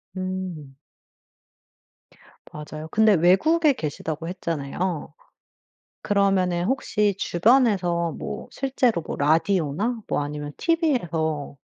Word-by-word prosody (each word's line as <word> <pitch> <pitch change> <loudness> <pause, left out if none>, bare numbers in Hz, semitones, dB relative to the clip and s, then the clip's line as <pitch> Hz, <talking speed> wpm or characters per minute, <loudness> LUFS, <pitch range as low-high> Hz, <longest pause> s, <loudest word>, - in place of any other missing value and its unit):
음. 185 -7 -5 1.8
맞아요. 155 +1 -8
근데 220 0 +5
외국에 275 - +4
계시다고 160 - -5
했잖아요. 165 -1 -3 0.9
그러면은 190 -3 +1
혹시 210 -4 0
주변에서 180 - +2
뭐 - - -6
실제로 255 -8 0
뭐 - - -6
라디오나 165 - +1
뭐 - - 0
아니면 145 0 -5
TV에서 170 - 0
180 Hz, 225 characters per minute, -24 LUFS, 155-210 Hz, 1.8 s, 근데